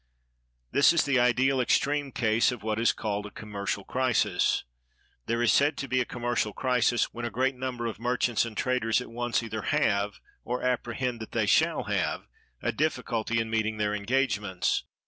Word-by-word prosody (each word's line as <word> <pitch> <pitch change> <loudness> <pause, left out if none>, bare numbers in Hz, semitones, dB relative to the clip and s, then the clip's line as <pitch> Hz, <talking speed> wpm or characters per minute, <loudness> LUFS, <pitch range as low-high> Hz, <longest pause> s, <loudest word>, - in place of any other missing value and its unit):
This 140 - +5
is 170 - +2
the 135 -3 +2
ideal 130 +2 +3
extreme 140 +3 +1
case 115 +1 +2
of 120 -4 -7
what 110 0 -1
is 115 - +4
called 105 -1 -3
a - - -9
commercial 100 -1 -4
crisis. 130 0 +1 0.6
There 115 +1 0
is 115 -4 +4
said 145 +1 +3
to 140 - -4
be 130 0 +1
a - - -1
commercial 120 -3 -2
crisis 125 -1 +1
when 120 - -6
a 120 - -1
great 130 +3 0
number 125 -2 -4
of 115 -2 -4
merchants 125 -1 +1
and 115 -3 -7
traders 125 -3 +1
at 125 - -8
once 120 0 -1
either 110 -1 -4
have, 100 0 0 0.2
or 125 +1 -3
apprehend 125 -1 -1
that 110 - -9
they - - +1
shall - - +3
have, - - -1 0.4
a - - +1
difficulty 115 -5 -1
in 115 0 -2
meeting 110 -1 0
their 105 -1 0
engagements. 105 -4 0
120 Hz, 180 wpm, -28 LUFS, 110-125 Hz, 0.6 s, This